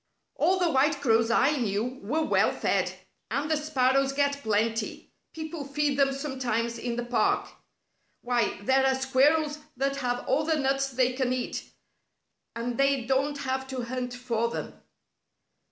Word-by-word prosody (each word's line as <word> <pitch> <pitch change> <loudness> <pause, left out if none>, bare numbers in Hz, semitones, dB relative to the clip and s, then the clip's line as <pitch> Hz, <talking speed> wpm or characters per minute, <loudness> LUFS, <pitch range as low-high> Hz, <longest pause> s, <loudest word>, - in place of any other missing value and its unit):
"All 375 - +2
the 355 -3 +2
white 280 +1 +2
crows 230 -4 +3
I 275 +6 +3
knew 235 +2 -2
were 300 +11 0
well - - +3
fed. - - 0 0.4
And 295 +3 -1
the - - +4
sparrows 275 -3 +1
get 280 0 0
plenty. 220 0 -1 0.2
People 315 -1 -6
feed 285 0 -1
them 275 -1 +4
sometimes 260 -4 -2
in 240 0 -3
the 240 0 -3
park. 245 - +1 0.8
Why, 240 -5 0
there 265 +4 +3
are 265 0 +3
squirrels 290 +4 +2 0.2
that 275 +1 0
have 245 -2 -2
all 275 +4 +2
the 320 +1 +1
nuts 275 -1 +1
they 255 -1 +1
can 255 -1 0
eat, 255 -1 -4 0.9
and 235 +1 -3
they 275 -3 +2
don't 275 +3 +1
have 265 0 -2
to 260 -2 -4
hunt 250 0 -4
for 235 -2 -1
them." - - -5
265 Hz, 155 wpm, -27 LUFS, 245-280 Hz, 0.9 s, the